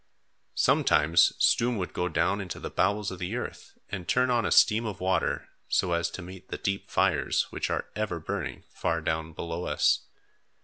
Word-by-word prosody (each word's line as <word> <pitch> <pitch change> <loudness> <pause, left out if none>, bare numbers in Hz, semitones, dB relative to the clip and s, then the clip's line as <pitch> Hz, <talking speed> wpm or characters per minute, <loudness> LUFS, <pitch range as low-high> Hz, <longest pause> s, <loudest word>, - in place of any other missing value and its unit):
Sometimes 75 +3 +4
Stoom 120 0 +3
would 90 -2 -4
go 90 0 -1
down 90 +5 +1
into 90 -3 -6
the - - -6
bowels 105 0 +1
of 95 - -7
the 90 +5 -3
earth 125 - -7
and 90 -4 -6
turn 125 0 +2
on 120 -3 +2
a - - -3
stream 110 +1 +5
of 105 -4 -4
water 95 +1 0 0.2
so 90 - +1
as 85 0 +1
to 95 - -7
meet 95 +1 -11
the - - -4
deep 95 0 -3
fires - - +2
which - - -2
are - - -1
ever 105 -5 -2
burning 80 - -4
far - - -1
down 80 0 -2
below 85 +2 -4
us. - - +2
95 Hz, 185 wpm, -28 LUFS, 85-105 Hz, 0.2 s, stream